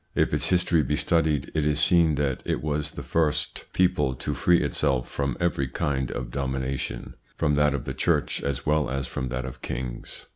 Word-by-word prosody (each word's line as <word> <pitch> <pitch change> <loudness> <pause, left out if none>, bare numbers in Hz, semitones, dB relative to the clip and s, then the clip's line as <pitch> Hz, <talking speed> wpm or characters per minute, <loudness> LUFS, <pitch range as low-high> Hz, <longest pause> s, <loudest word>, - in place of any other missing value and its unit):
If - - +2
its - - +1
history 85 -2 +3
be 75 - 0
studied, 80 -2 +1
it 80 - +1
is 75 0 +1
seen 85 -4 +4
that 70 -2 -1
it - - -2
was 75 -1 -1
the - - -8
first 80 -3 0
people 75 -7 +2
to 65 - -3
free 90 -1 +3
itself 65 -2 0
from 70 -3 -2
every 85 -6 0
kind 65 0 -1
of 60 -1 -5
domination, 65 -1 -3 0.2
from 75 -2 +1
that 75 0 +3
of 65 - -4
the - - -3
Church - - +1
as 70 -3 -3
well 75 -3 +2
as 65 0 -2
from 65 +1 -4
that 65 0 -3
of 65 - -8
kings. 60 -1 -6
70 Hz, 195 wpm, -26 LUFS, 65-75 Hz, 0.2 s, seen